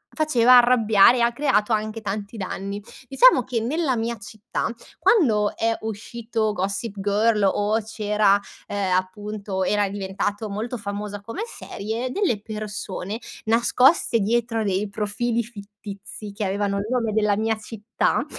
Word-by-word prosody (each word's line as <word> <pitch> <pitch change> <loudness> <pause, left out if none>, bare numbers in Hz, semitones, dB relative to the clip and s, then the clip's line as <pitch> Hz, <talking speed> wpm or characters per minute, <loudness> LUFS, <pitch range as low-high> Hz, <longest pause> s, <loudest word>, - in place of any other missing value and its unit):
faceva 255 -5 +6
arrabbiare, 240 -1 +5
ha 235 0 +3
creato 235 -5 +1
anche 215 +1 -2
tanti 205 +1 -5
danni. 200 +1 -5 0.3
Diciamo 275 - +6
che 240 0 -2
nella 265 +3 0
mia 230 +1 -2
città 210 0 -4 0.3
quando 220 - +3
è 225 0 +1
uscito 220 0 -3
Gossip 200 +3 -3
Girl 210 +2 +2
o 205 +3 +2
c'era 210 -2 +2 0.3
ehm, 195 -2 -1
appunto 195 +1 -3
era 205 +1 +1
diventato 200 +2 -3
molto 220 +5 -4
famosa 205 -1 -5
come 230 - -7
serie, 230 - -5
delle 355 - 0
persone 210 -1 -5 0.3
nascoste 240 +3 +3
dietro 230 +2 0
dei 200 0 0
profili 220 +3 -1
fittizi, 205 -1 -10
che 205 +1 -3
avevano 200 +1 -1
il 200 +1 -3
nome 240 -3 0
della 210 -1 +2
mia 220 0 0
città, 220 +1 -1
215 Hz, 135 wpm, -23 LUFS, 205-230 Hz, 0.3 s, faceva